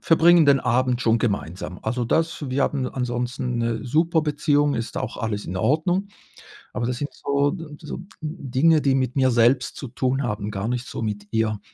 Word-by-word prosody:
verbringen 170 -1 +5
den 140 -1 +5
Abend 125 0 +1
schon 115 0 +3
gemeinsam. 95 -5 -3
Also, 120 +2 -1
das 160 +3 0
wir 130 +2 0
haben 135 -2 0
ansonsten 125 0 -2
'ne 115 -1 -1
super 160 +5 +2
Beziehung, 145 -1 +1
ist 115 - -4
auch - - -3
alles 105 -2 -3
in 90 - -5
Ordnung. 160 - +1 0.7
Aber 120 - -2
das 125 0 -2
sind 145 +3 -4
so 140 +3 0 0.2
so 155 - -7 0.2
Dinge, 155 0 +2
die 135 -2 +2
mit 130 -2 0
mir 130 -2 +3
selbst 120 +2 +3
zu 135 - -6
tun 130 +3 -1
haben, 105 -3 -3
gar 100 +1 -3
nicht 125 +1 -2
so - - -6
mit 105 -2 -4
ihr. 110 -2 0
125 Hz, 185 wpm, -23 LUFS, 115-145 Hz, 0.7 s, verbringen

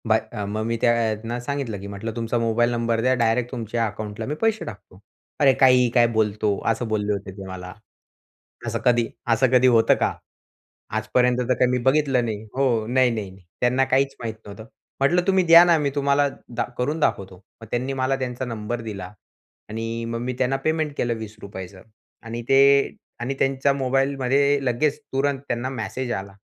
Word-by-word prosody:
Bye 110 0 +4
अ, 105 -3 -3
मग 105 +2 -3
मी 115 +1 -1
त्यांना 115 0 0
सांगितलं 125 -5 -4
की 100 - -8
म्हटलं, 100 +3 -5
"तुमचा 115 0 -1
मोबाईल 115 +1 +2
नंबर 115 -1 0
द्या 130 +2 +3
डायरेक्ट 120 0 +1
तुमच्या 115 -2 -2
अकाउंटला 105 +1 -6
मी 150 - -3
पैसे 225 -1 +1
टाकतो." 105 -4 -11 0.4
"अरे, 140 -3 +5
काहीही 125 -1 +5
काय 120 -1 +6
बोलतो," 105 -1 +1
असं 115 +1 -3
बोलले 105 -1 0
होते 100 -1 -5
ते 100 - -8
मला. 90 -1 -8 0.9
"असं - - -2
कधी 120 -1 +3 0.3
असं 115 +4 +3
कधी 130 0 +5
होतं 115 -2 +5
का? - - 0 0.8
आजपर्यंत 125 +3 +2
तर 125 +1 +1
काही 125 0 +2
मी 125 - +1
बघितलं 135 -4 +2
नाही." 110 -2 -4
हो, 125 -5 +1
नाही-नाही-नाही, 110 -7 0 0.2
त्यांना 125 +2 +3
काहीच 135 +1 +2
माहीत 115 -2 -3
नव्हतं. 105 +2 -10 0.3
म्हटलं, 170 +6 +3
"तुम्ही 190 -1 +4
द्या 170 +1 +9
ना, 170 -2 +4
मी 145 -1 0
तुम्हाला 140 0 +2 0.3
दा 120 - +1
करून 145 +6 -1
दाखवतो." 95 - -2 0.2
मग 115 - -10
त्यांनी 130 +3 -1
मला 130 +1 +1
त्यांचा 125 0 -3
नंबर 115 0 -4
दिला 105 -4 -7 0.6
आणि 115 +1 -4
मग 115 0 -3
मी 125 +1 -2
त्यांना 130 +1 +1
पेमेंट 155 -2 0
केलं 120 -1 0
₹20 110 -1 -8
रुपयाचं 95 -1 -9 0.4
आणि 115 +1 -5
ते 135 - +6 0.6
आणि 120 +3 -2
त्यांच्या 135 +1 +2
मोबाईलमध्ये 135 +1 +1
लगेच 140 +4 +1
तुरंत 135 0 0
त्यांना 120 +2 -2
मेसेज 125 +1 -4
आला 100 -2 -5
120 Hz, 175 wpm, -23 LUFS, 110-135 Hz, 0.9 s, द्या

